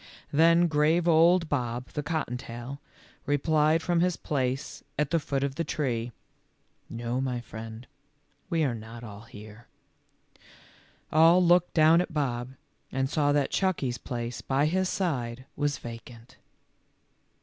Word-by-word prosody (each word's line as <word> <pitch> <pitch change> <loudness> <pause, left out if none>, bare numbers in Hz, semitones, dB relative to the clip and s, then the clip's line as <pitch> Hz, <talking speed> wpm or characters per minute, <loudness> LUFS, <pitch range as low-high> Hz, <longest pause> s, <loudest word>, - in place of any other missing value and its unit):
Then 165 +3 +5
grave 160 +2 +2
old 170 +1 +5
Bob, 125 -4 -2
the 150 - -4
cottontail, 130 -4 -4 0.5
replied 155 +2 +2
from 175 -1 +1
his 180 0 +1
place 130 -2 -3
at 150 -1 0
the 165 - +3
foot 140 -2 -2
of 140 -1 -1
the 165 - -2
tree, 125 -7 -2 0.4
" - - -44
No, 120 +2 -3
my 125 -2 -2
friend, 115 0 -9 0.6
we 165 -3 +1
are 135 -5 +1
not 115 +1 -9
all 105 -3 -9
here." 110 +1 -13 1.4
All 165 +3 +6
looked 175 0 +3
down 160 +1 +6
at 180 -2 -5
Bob, 130 -3 -2 0.4
and 135 +1 -1
saw 145 -2 +2
that 145 -2 +1
Chucky 185 -9 0
's 120 - -6
place 120 -2 -5
by 135 +4 +1
his 185 +4 +1
side 130 -9 -2
was 145 0 -1
vacant. 115 0 -11
140 Hz, 140 wpm, -28 LUFS, 120-160 Hz, 1.4 s, All